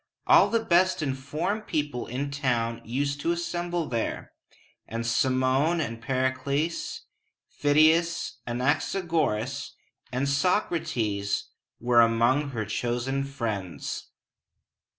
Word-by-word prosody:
All -, -, +6 dB
the 230 Hz, -1 st, 0 dB
best 180 Hz, -2 st, +3 dB
informed 155 Hz, +10 st, -2 dB
people 145 Hz, -5 st, -2 dB
in 135 Hz, +4 st, -3 dB
town 120 Hz, -5 st, -1 dB
used 140 Hz, +4 st, -2 dB
to 170 Hz, -, +1 dB
assemble 175 Hz, 0 st, -2 dB
there; 115 Hz, -2 st, -3 dB, 0.6 s
and 115 Hz, +1 st, -4 dB
Cimon 130 Hz, +7 st, +2 dB
and 115 Hz, -6 st, -3 dB
Pericles, 130 Hz, +5 st, -1 dB, 0.5 s
Phidias, 160 Hz, +3 st, +2 dB
Anaxagoras, 135 Hz, -, -1 dB, 0.4 s
and 130 Hz, +2 st, 0 dB
Soc´ra 165 Hz, +5 st, +1 dB
tes 100 Hz, -3 st, -1 dB, 0.3 s
were 120 Hz, 0 st, +5 dB
among 120 Hz, +5 st, +3 dB
her 115 Hz, -5 st, -3 dB
chosen 125 Hz, +5 st, -1 dB
friends. 110 Hz, -10 st, -4 dB
135 Hz, 100 wpm, -27 LUFS, 120-160 Hz, 0.6 s, All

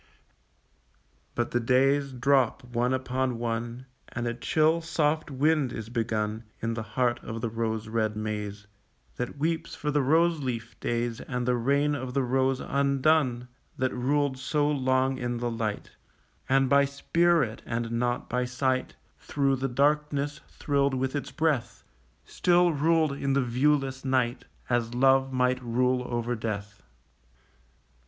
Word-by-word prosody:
But 120 Hz, 0 st, -1 dB
the 120 Hz, -, +1 dB
days 135 Hz, +3 st, +2 dB
drop 130 Hz, 0 st, +2 dB
one 120 Hz, 0 st, -1 dB
upon 130 Hz, -1 st, -1 dB
one, 120 Hz, +2 st, -3 dB, 0.2 s
And 120 Hz, 0 st, -4 dB
a 120 Hz, -, -1 dB
chill 155 Hz, +6 st, +2 dB
soft 155 Hz, -2 st, 0 dB
wind 145 Hz, -1 st, +1 dB
is 110 Hz, -2 st, -6 dB
begun 110 Hz, -1 st, -2 dB
In 115 Hz, 0 st, -2 dB
the 115 Hz, -, -3 dB
heart 120 Hz, +1 st, 0 dB
of 110 Hz, +1 st, -5 dB
the 115 Hz, -, -2 dB
rose 110 Hz, -1 st, -2 dB
red 110 Hz, -1 st, -1 dB
maze 105 Hz, -1 st, -4 dB, 0.5 s
That 125 Hz, +3 st, -4 dB
weeps 160 Hz, +2 st, -2 dB
for 150 Hz, -, -2 dB
the 145 Hz, 0 st, +2 dB
roseleaf 140 Hz, -6 st, +1 dB
days 120 Hz, -1 st, -2 dB
And 125 Hz, -1 st, -3 dB
the 125 Hz, -, +3 dB
reign 140 Hz, +5 st, +2 dB
of 130 Hz, -2 st, -4 dB
the 135 Hz, -, +2 dB
rose 130 Hz, +1 st, +1 dB
undone 140 Hz, -2 st, +1 dB, 0.3 s
That 130 Hz, 0 st, 0 dB
ruled 135 Hz, +1 st, 0 dB
so 145 Hz, +3 st, 0 dB
long 130 Hz, -2 st, +1 dB
in 120 Hz, -1 st, -2 dB
the 120 Hz, 0 st, -2 dB
light, 110 Hz, -2 st, -3 dB, 0.6 s
And 135 Hz, 0 st, +4 dB
by 140 Hz, +1 st, +5 dB
spirit, 145 Hz, -3 st, +1 dB
and 115 Hz, -1 st, -2 dB
not 120 Hz, +1 st, -1 dB
by 125 Hz, 0 st, -1 dB
sight, 130 Hz, +1 st, -1 dB, 0.2 s
Through 135 Hz, -2 st, 0 dB
the 135 Hz, +1 st, -2 dB
darkness 145 Hz, +2 st, 0 dB
thrilled 140 Hz, -2 st, 0 dB
with 130 Hz, +2 st, -1 dB
its 145 Hz, -, -3 dB
breath, 155 Hz, -7 st, -1 dB, 0.4 s
Still 175 Hz, -1 st, +3 dB
ruled 160 Hz, +1 st, +2 dB
in 140 Hz, 0 st, -1 dB
the 140 Hz, -1 st, +2 dB
viewless 135 Hz, +2 st, +1 dB
night, 130 Hz, -3 st, 0 dB, 0.2 s
As 120 Hz, -1 st, 0 dB
love 135 Hz, +1 st, +4 dB
might 125 Hz, 0 st, +1 dB
rule 125 Hz, +1 st, +1 dB
over 120 Hz, 0 st, -1 dB
death. 105 Hz, -3 st, -5 dB
130 Hz, 145 wpm, -27 LUFS, 120-140 Hz, 0.6 s, by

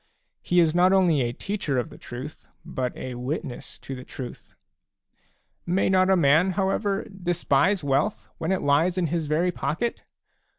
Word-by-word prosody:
He 175 Hz, -, +2 dB
is 165 Hz, -2 st, +4 dB
not 180 Hz, +2 st, +4 dB
only 175 Hz, -7 st, +4 dB
a 120 Hz, -1 st, 0 dB
teacher 175 Hz, -1 st, -3 dB
of 125 Hz, -, -2 dB
the -, -, -12 dB
truth, 130 Hz, +5 st, -8 dB, 0.2 s
but 125 Hz, -1 st, -3 dB
a 130 Hz, -, -5 dB
witness 125 Hz, +2 st, -5 dB
to 135 Hz, -, -8 dB
the 130 Hz, -1 st, -7 dB
truth. 130 Hz, -1 st, -9 dB, 0.5 s
" -, -, -43 dB
May 180 Hz, +3 st, +2 dB
not 185 Hz, 0 st, +4 dB
a 190 Hz, -, +6 dB
man, 165 Hz, +3 st, +4 dB
however, 195 Hz, +1 st, 0 dB
despise 175 Hz, -1 st, +1 dB
wealth 140 Hz, +9 st, 0 dB
when 165 Hz, +3 st, -1 dB
it 190 Hz, -, 0 dB
lies 160 Hz, +6 st, +3 dB
in 180 Hz, -, +2 dB
his 165 Hz, -3 st, -1 dB
very 165 Hz, +4 st, +1 dB
pocket 230 Hz, +7 st, -2 dB
170 Hz, 170 wpm, -25 LUFS, 140-185 Hz, 0.5 s, a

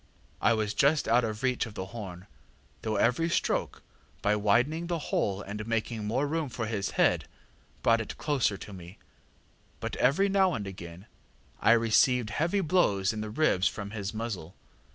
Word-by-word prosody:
I 115 Hz, -, +4 dB
was 110 Hz, -1 st, -1 dB
just 145 Hz, +6 st, +3 dB
out 120 Hz, +2 st, +4 dB
of 110 Hz, +1 st, -4 dB
reach 125 Hz, -2 st, +1 dB
of 105 Hz, -, -11 dB
the 95 Hz, -, -4 dB
horn, 95 Hz, -5 st, -7 dB, 0.6 s
though 110 Hz, -1 st, -2 dB
every 125 Hz, +11 st, +2 dB
stroke, -, -, -1 dB, 0.4 s
by 105 Hz, +1 st, +3 dB
widening 125 Hz, +11 st, +2 dB
the 170 Hz, -1 st, -1 dB
hole 100 Hz, -9 st, -1 dB
and 105 Hz, +2 st, -6 dB
making 115 Hz, -1 st, -2 dB
more 125 Hz, +7 st, 0 dB
room 155 Hz, 0 st, -2 dB
for 115 Hz, -1 st, -4 dB
his 105 Hz, -3 st, -2 dB
head, -, -, +3 dB, 0.6 s
brought 115 Hz, 0 st, +4 dB
it 110 Hz, -, -7 dB
closer 135 Hz, -9 st, 0 dB
to 100 Hz, -, -10 dB
me, 90 Hz, +1 st, -11 dB, 0.8 s
but -, -, -4 dB
every 155 Hz, +11 st, +3 dB
now 190 Hz, -3 st, +3 dB
and 105 Hz, -, -4 dB
again 90 Hz, -1 st, -9 dB, 0.5 s
I 115 Hz, -, +5 dB
received 115 Hz, +1 st, +3 dB
heavy 170 Hz, +6 st, +1 dB
blows 115 Hz, -, +2 dB
in 110 Hz, -, -4 dB
the 110 Hz, -, -4 dB
ribs 105 Hz, -6 st, +2 dB
from 100 Hz, -1 st, -5 dB
his 100 Hz, -2 st, -4 dB
muzzle. 105 Hz, -7 st, -5 dB
115 Hz, 175 wpm, -29 LUFS, 100-140 Hz, 0.8 s, I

